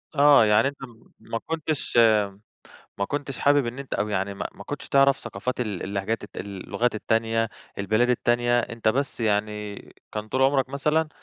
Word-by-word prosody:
آه، 145 -4 +7
يعني 105 +4 +4
أنت 140 - -5
م 120 -3 -13
ما 115 - -4
كُنتش 155 -5 -2 1.0
ما 100 - +1
كُنتش 140 +3 -4
حابب 145 -2 +3
إن 120 +3 -5
أنت 140 - -5
أو 105 - -1
يعني 100 0 -1
م - - -14
ما - - -6
كُنتش - - -6
تعرَف 140 0 +4
ثقافات 120 +3 -4
ال 105 -6 -3
اللهجات 100 +3 -2
الت - - -14
اللغات 100 +4 -2
التانية، 115 +1 0 0.3
البلاد 110 +5 +2
التانية، 120 0 +2
أنت 115 -2 -1
بس 135 +3 -1
يعني 105 -1 -1 0.4
كان 105 0 -5
طول 130 +3 0
عمرك 135 -1 +3
مثلًا 150 +3 0
120 Hz, 170 wpm, -25 LUFS, 105-135 Hz, 1.0 s, آه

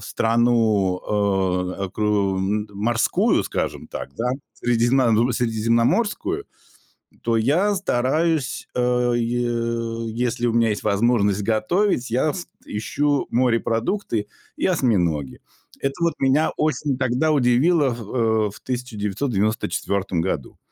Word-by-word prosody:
страну, 115 -5 +2 0.8
э, 100 - -2
окру 100 0 0 0.4
морскую, 115 +3 +1
скажем - - -3
так, - - -7
да, 125 +2 -1 0.2
средиземна 120 0 +2
средиземноморскую, 120 - 0 0.8
то 115 - +1
я 165 - +2
стараюсь, 155 -4 0
э, 125 0 +1
е 115 -1 -2
если 120 0 -1
у 115 - 0
меня 115 -1 +3
есть 105 - -2
возможность 105 -1 +2
готовить, 120 - +1
я 130 +5 +1
с 180 -2 -6 0.2
ищу 145 +7 -1
морепродукты 115 - 0 0.3
и - - -2
осьминоги. 90 - 0 0.4
Это 135 0 0
вот 170 - +2
меня 135 +4 +2
осень 150 -2 0
тогда 130 +5 +1
удивило, 135 +2 +3
х 120 - -8
э, 110 -1 0
в - - -13
1994 105 -5 -1
году. 80 -7 -3
120 Hz, 105 wpm, -22 LUFS, 110-130 Hz, 0.8 s, меня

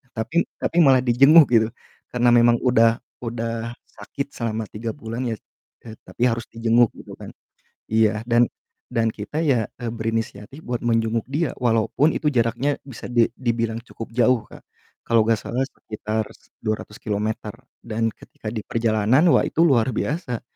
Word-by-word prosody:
Tapi 135 +10 0
tapi 175 - -2
malah 130 -2 +5
dijenguk 135 +5 +7
gitu. 110 -2 +4 0.4
Karena 120 0 +3
memang 120 0 +5
udah 115 -2 +4 0.3
udah 115 0 -4
sakit 140 0 -7
selama 110 -2 -3
3 110 +1 -4
bulan 115 -2 -5
ya, 110 - -2 0.5
e 110 -1 -9
tapi 120 - -4
harus 115 -1 -1
dijenguk 115 +1 +3
gitu - - -11
kan, - - -9 0.6
iya. 110 -1 +2
Dan 120 0 +4 0.4
dan 115 -2 +1
kita 110 +9 -5
ya, 125 -8 +2
e 120 - -4
berinisiatif 115 +2 -4
buat 120 -1 -3
menjenguk 115 -1 +1
dia 150 +1 0
walaupun 120 +5 +2
itu 150 - -1
jaraknya 120 +4 +1
bisa 130 -5 -9
di 120 -2 +4
dibilang 115 -2 -1
cukup 115 -2 -9
jauh, 125 -1 +3
Kak. - - -13 0.5
Kalau 115 -1 +4
gak 115 -1 +3
salah 125 +3 -3
sekitar 110 -2 -4 0.4
200 105 -1 -3
kilometer 105 0 -2 0.3
dan 115 0 -1
ketika 110 - -9
diperjalanan, 115 +3 +1
wah - - +5
itu 160 - 0
luar 120 -5 +3
biasa, 145 -6 -2
115 Hz, 150 wpm, -22 LUFS, 110-125 Hz, 0.6 s, dijenguk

